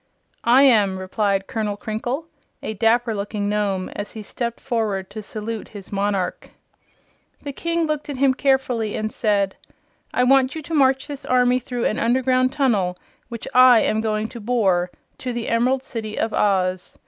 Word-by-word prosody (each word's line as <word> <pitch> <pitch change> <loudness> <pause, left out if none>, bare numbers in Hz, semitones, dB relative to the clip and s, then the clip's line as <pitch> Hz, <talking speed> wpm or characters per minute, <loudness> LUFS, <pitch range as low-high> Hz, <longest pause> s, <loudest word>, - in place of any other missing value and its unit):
"I 260 +3 +7
am," 210 -8 +4
replied 195 +1 -1
Colonel 210 -2 -3
Crinkle, 240 +9 -3 0.4
a 220 - -3
dapper 225 +2 +2
looking 205 0 -3
Nome, 205 -3 -1
as 205 0 -6
he 220 - -7
stepped 235 +2 -4
forward 215 -7 -2
to 215 - -6
salute 215 +1 -6
his 200 -3 -11
monarch. 200 -2 -1 0.9
The 285 -1 -5
King 335 +2 -1
looked 305 -1 -3
at 285 - -3
him 270 0 +4
carefully 255 -5 0
and 215 0 -2
said: 200 -3 0 0.5
"I 250 - +2
want 265 +1 +4
you 315 - -5
to 325 - -7
march 265 -3 +3
this 285 -2 -8
army 250 0 +3
through 245 -1 -4
an 215 - 0
underground 255 +2 +2
tunnel, 210 -11 +1 0.3
which 235 -2 -7
I 250 -2 +7
am 220 - +1
going 215 0 -1
to 235 - -9
bore, 200 -6 +1 0.3
to 250 -1 -4
the 235 -1 -4
Emerald 255 +3 +1
City 220 -4 -6
of 225 - -1
Oz. 185 -3 0
225 Hz, 170 wpm, -22 LUFS, 205-255 Hz, 0.9 s, I